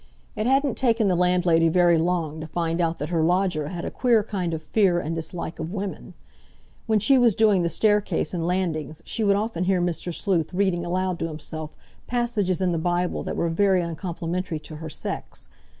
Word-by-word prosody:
It 215 +1 -1
hadn't 270 +1 +2
taken 230 -5 +2
the 180 - +2
landlady 175 -2 +3
very 175 0 +4
long 165 -2 -1
to 155 - -6
find 165 +1 -1
out 165 0 0
that 150 - -4
her 170 -2 +1
lodger 175 -2 +1
had 170 +1 -5
a - - -4
queer 235 -4 +3
kind 190 -5 -3
of 160 -1 -4
fear 185 0 +2
and 165 -1 -3
dislike 165 +1 -4
of 160 +3 -4
women. 200 -1 -5 0.7
When 220 -1 +3
she 265 +6 +4
was 235 -5 +4
doing 210 -4 +4
the 170 - 0
staircase 210 +4 +1
and 170 -2 -2
landings 160 -4 -2
she 225 - -1
would 200 -1 +4
often 205 -4 -1
hear 190 -1 +2
Mr. 175 0 -2
Sleuth 180 -1 -1
reading 180 -3 +1
aloud 185 0 -1
to 165 - -1
himself 155 0 -6 0.3
passages 225 -7 0
in 185 -1 +2
the 165 - -1
Bible 175 +1 -1
that - - -4
were 170 - +1
very 185 +2 +2
uncomplimentary 170 +1 -4
to 155 0 -9
her 160 +1 -7
sex. - - -5
180 Hz, 195 wpm, -24 LUFS, 165-200 Hz, 0.7 s, very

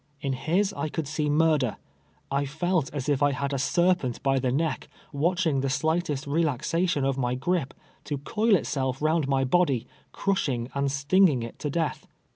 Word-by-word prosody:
In 135 -1 -2
his 185 +9 0
I 155 - -3
could 155 -1 -3
see 150 +1 -1
mur 155 +1 +3
der. 125 -5 -2 0.5
I 140 +1 +1
felt 160 +1 -1
as 140 -3 -4
if 145 -2 +1
I 145 0 +3
had 140 +1 -2
a - - 0
ser]3ent 170 -2 +1
by 135 -1 +2
the 130 -1 0
neck, 155 +4 -1 0.3
watch 175 +6 +1
ing 140 -5 +1
the 135 - -1
slightest 155 +1 0
relaxation 160 +1 0
of 135 0 0
my 125 -1 0
gripe, 145 +1 -1 0.3
to 145 - -2
coil 215 +9 +2
itself 135 -6 -1
round 155 -1 +1
my 135 -1 +2
body, 135 -4 +2 0.3
crushing 130 -11 -1
and 140 0 0
stinging 145 -1 +3
it 115 - -8
to 150 - -2
death. 160 +1 -2
145 Hz, 185 wpm, -26 LUFS, 135-165 Hz, 0.5 s, mur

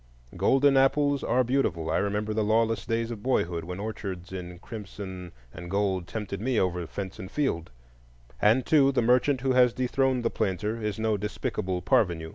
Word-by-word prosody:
Golden 135 0 +4
apples 140 +1 +3
are 130 - +2
beautiful—I 115 -11 0
remember 105 +1 -1
the 110 0 0
lawless 115 +1 +1
days 115 0 -1
of 110 -3 -6
boyhood, 85 -9 0
when 90 +2 -6
orchards 100 -3 -6
in 90 -1 -6
crimson 95 -3 -8 0.2
and 85 +1 -8
gold 95 -2 0
tempted 105 -3 -5
me 125 0 +1
over 90 -2 -1
fence 95 +1 -6
and 95 - -7
field—and, 60 - -2
too, 140 -3 +4
the 130 - +1
merchant 125 +3 +3
who 135 0 +1
has 125 -2 +5
dethroned 130 0 0
the - - +1
planter 105 +2 -2
is 105 -1 -2
no 110 -1 0
despicable 105 -3 -3
parvenu. 85 -11 +1
105 Hz, 165 wpm, -27 LUFS, 90-125 Hz, 0.2 s, has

